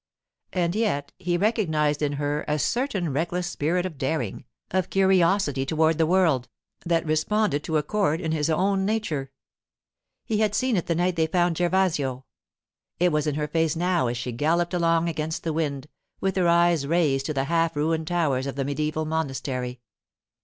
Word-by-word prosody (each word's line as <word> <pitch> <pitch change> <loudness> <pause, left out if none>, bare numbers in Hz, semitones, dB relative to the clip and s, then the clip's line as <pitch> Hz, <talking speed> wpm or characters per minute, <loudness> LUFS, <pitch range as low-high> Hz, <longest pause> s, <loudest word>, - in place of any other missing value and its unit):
And 175 -2 0
yet 195 -10 -1
he 175 -1 0
recognized 160 -8 +1
in 145 -1 0
her 145 +1 -2
a 150 - +1
certain 195 - -1
reckless 175 +4 -1
spirit 175 +1 -1
of 160 -7 -6
daring, 150 +4 -2 0.3
of 185 -1 0
curiosity 190 -6 +3
toward 160 +2 +1
the 160 - +3
world, 165 -8 +2 0.3
that 170 -1 +1
responded 155 +1 +1
to 160 - 0
a 150 - 0
chord 180 -2 0
in 160 -3 -2
his 155 0 0
own 190 +4 +1
nature. 180 -11 -2 0.9
He 215 -3 -1
had 210 -1 +1
seen 255 -3 +1
it 175 - -1
the 170 - +1
night 175 +1 0
they 160 -1 +2
found 175 0 +1
Gervasio. 170 -8 +1 0.8
It 180 0 +3
was 150 0 0
in 150 - 0
her 150 0 -1
face 160 0 0
now 175 -4 +1
as 120 0 -2
she 120 +1 -4
galloped 165 +8 0
along 165 -1 +2
against 160 -1 -3
the 160 - -1
wind, 145 -4 -2 0.3
with 190 -1 -1
her 180 -2 +2
eyes 170 -3 +3
raised 145 -5 +1
to 155 - -2
the 135 - +1
half 165 +2 +1
ruined 160 +1 0
towers 145 -7 0
of 140 - -4
the 135 -1 -2
mediæval 155 +2 -2
monastery. 135 -5 -3
160 Hz, 180 wpm, -25 LUFS, 145-180 Hz, 0.9 s, curiosity